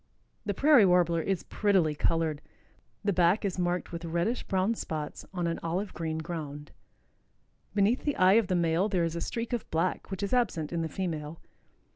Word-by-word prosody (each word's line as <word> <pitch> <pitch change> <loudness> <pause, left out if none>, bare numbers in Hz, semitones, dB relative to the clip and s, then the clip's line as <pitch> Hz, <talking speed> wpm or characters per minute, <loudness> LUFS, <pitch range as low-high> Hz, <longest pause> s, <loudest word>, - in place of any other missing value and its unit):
The 205 - 0
Prairie 285 -3 +6
Warbler 175 -2 +3
is 190 0 -1
prettily 190 -7 +2
colored. 155 0 0 0.6
The 200 -1 +1
back 180 +4 +3
is 185 -2 -2
marked 175 0 -1
with 170 0 -6
reddish 170 +9 -1
brown 190 +3 0
spots 155 -8 -5
on 180 -2 -2
an 165 0 -1
olive 185 +4 -2
green 160 -1 -3
ground. 150 -3 -6 1.0
Beneath 210 +5 +2
the 290 - 0
eye 185 +1 +5
of 205 - -8
the 185 - 0
male 170 +3 +2
there 185 -4 +1
is 165 0 -1
a 170 - -3
streak 230 +5 -3
of 240 - -3
black 165 +3 -1
which 190 +1 -4
is 200 - -2
absent 180 -11 0
in 170 - 0
the 160 - -2
female. 160 -3 -4
175 Hz, 185 wpm, -29 LUFS, 165-200 Hz, 1.0 s, Prairie